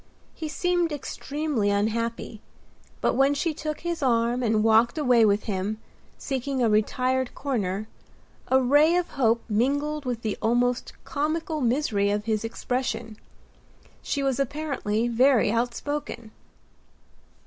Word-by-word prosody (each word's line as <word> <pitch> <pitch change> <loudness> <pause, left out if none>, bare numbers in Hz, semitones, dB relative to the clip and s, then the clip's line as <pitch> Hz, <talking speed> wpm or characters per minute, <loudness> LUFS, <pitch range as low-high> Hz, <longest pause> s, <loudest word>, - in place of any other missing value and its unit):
He 315 - -5
seemed 350 +1 0
extremely 290 -4 -2
unhappy; 220 +2 -2 0.6
but - - +2
when 275 +2 +3
she 320 +2 -1
took 305 0 -5
his 340 -1 -3
arm 240 -1 +1
and 220 -3 +2
walked 225 +5 +4
away 250 -6 +4
with 205 0 +2
him, 205 +1 -2 0.4
seeking 270 0 -3
a 240 - +3
retired 255 +4 +1
corner, 215 -7 -2 0.6
a 260 - +4
ray 290 +6 +4
of 355 -1 0
hope 235 -3 +1
mingled 285 +7 0
with 245 -2 -3
the 215 -2 -2
almost 245 +2 +1
comical 310 +1 -2
misery 235 -5 +1
of 205 +1 -1
his 220 -1 0
expression. 230 -1 -3 0.9
She 280 - -2
was 270 -1 0
apparently 275 -6 -1
very 240 -2 +3
outspoken. 240 0 -3
250 Hz, 125 wpm, -25 LUFS, 225-285 Hz, 0.9 s, walked